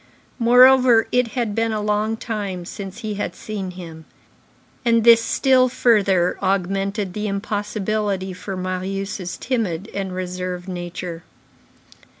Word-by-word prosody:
Moreover, 250 0 +6
it 250 -1 +2
had 230 -4 0
been 225 +1 0
a 215 - -1
long 210 +1 0
time 200 -6 -4
since 195 +1 -8
he 215 -1 -3
had 205 - -4
seen 200 -3 -5
him; 165 -3 -10 0.8
and 230 -2 +3
this 230 0 +7
still 255 +1 +3
further 195 -8 +2
augmented 195 +1 -1
the 210 +1 -3
impossibility 205 -1 -2
for 190 +1 -6
Marius' 185 0 -4
timid 215 -6 -2
and 190 -2 -4
reserved 180 0 -4
nature. 175 -1 -6
200 Hz, 125 wpm, -21 LUFS, 185-225 Hz, 0.8 s, this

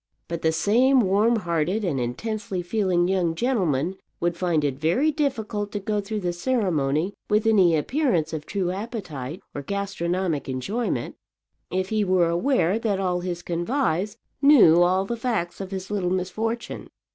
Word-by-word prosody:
But 170 -1 -4
the 160 - +2
same 245 +11 +4
warm 210 +4 +3
hearted 175 +1 -1
and 150 -7 -1
intensely 185 - -3
feeling 180 -2 +1
young 180 -3 +1
gentleman 185 - 0 0.2
would 175 0 0
find 170 -4 0
it 135 -2 -1
very 210 - +2
difficult 220 -8 -2
to 205 - -1
go 205 +1 -1
through 210 +1 -4
the 175 -1 -1
ceremony 175 - 0 0.2
with 210 +1 +2
any 190 -7 +5
appearance 185 - 0
of 155 -1 -5
true 185 -3 -1
appetite 185 - -6
or 145 - -4
gastronomic 180 -3 -2
enjoyment, 200 - -2 0.5
if 185 +1 -1
he 215 -1 +1
were 185 -3 +3
aware 190 +1 +1
that 210 -4 0
all 180 -2 0
his 175 -1 -4
convives 180 - -1 0.2
knew 245 - +7
all 185 +2 +3
the 235 - -3
facts 220 -8 -2
of 190 - -5
his 190 0 -6
little 195 -4 0
misfortune. 215 +6 -3
185 Hz, 155 wpm, -24 LUFS, 170-215 Hz, 0.5 s, knew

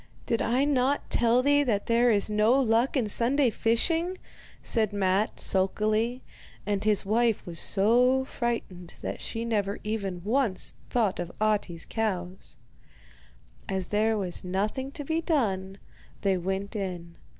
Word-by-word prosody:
'Did 230 - 0
I 250 +4 +2
not 280 0 0
tell 240 +1 +3
thee 285 +1 +4
that 220 -8 0
there 235 +1 +3
is 205 -3 +2
no 215 +5 +3
luck 240 +2 +2
in 250 - +1
Sunday 245 +5 +3
fishing?' 330 - +1 0.5
said 220 -3 +1
Matte 200 +1 0
sulkily; 215 +5 0 0.4
and 205 -1 -1
his 210 -2 +2
wife 225 +1 +1
was 170 -2 -7
so 245 +6 +3
frightened 210 -9 -4
that - - -4
she 230 +1 -4
never 205 -3 -1
even 200 -5 -3
once 225 -2 0 0.2
thought 220 -6 0
of 175 0 -4
Ahti's 210 -6 0
cows. 190 -5 -4 1.1
As 190 -2 -2
there 215 +1 +1
was 185 -4 -4
nothing 210 +9 -2
to 300 - -6
be 320 +3 0
done, 195 - -1 0.4
they 195 -1 +2
went 190 +3 -3
in. 175 -4 -5
215 Hz, 140 wpm, -27 LUFS, 195-245 Hz, 1.1 s, thee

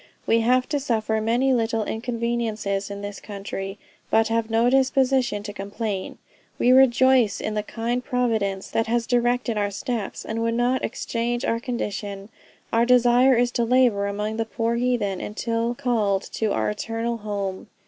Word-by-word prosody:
We 230 - +3
have 250 +3 +2
to 290 - 0
suffer 220 -4 0
many 245 +4 +2
little 225 -2 0
inconveniences 225 -4 -2
in 200 0 -7
this 205 0 -6
country, 195 -1 -6 0.3
but 220 0 +3
have 225 0 0
no 225 +2 +3
disposition 260 -4 +2
to 205 -1 -6
complain. 200 0 -4 0.4
We 245 - +3
rejoice 260 -3 +5
in 215 - -3
the 210 - 0
kind 235 +3 -3
providence 220 -7 -1
that 225 - 0
has 235 0 0
directed 240 -2 +1
our 205 0 0
steps, 210 +1 -4
and 225 +1 -3
would 230 0 0
not 245 +2 +1
exchange 240 +2 -2
our 230 - 0
condition. 205 -4 -4 0.4
Our 230 +1 +4
desire 250 +1 +5
is 240 +1 +2
to 240 - 0
labor 230 -4 +3
among 210 +2 -3
the 225 - 0
poor 230 +1 -1
heathen 235 -6 0
until 230 +2 -2
called 220 -7 0
to 220 -2 0
our 110 - 0
eternal 230 - -3
home." 200 -3 -4
230 Hz, 160 wpm, -24 LUFS, 210-245 Hz, 0.4 s, rejoice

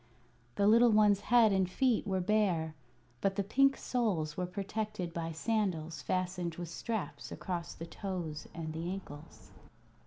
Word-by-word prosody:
The 200 - +2
little 230 +3 +7
one's 210 -2 +5
head 230 0 +5
and 190 -2 +2
feet 245 +3 +1
were 190 -1 0
bare, 180 -5 +1 0.5
but 195 -1 +1
the 200 - 0
pink 275 +7 +3
soles 185 -12 -1
were 180 -1 -2
protected 195 -2 -4
by 165 -1 -3
sandals 170 -4 -1
fastened 180 -2 -2
with 175 -1 -6
straps 220 +4 -4
across 175 -2 -4
the 165 - -7
toes 170 -4 -5
and 160 -1 -5
ankles. 165 -3 -7
185 Hz, 145 wpm, -32 LUFS, 170-215 Hz, 0.5 s, little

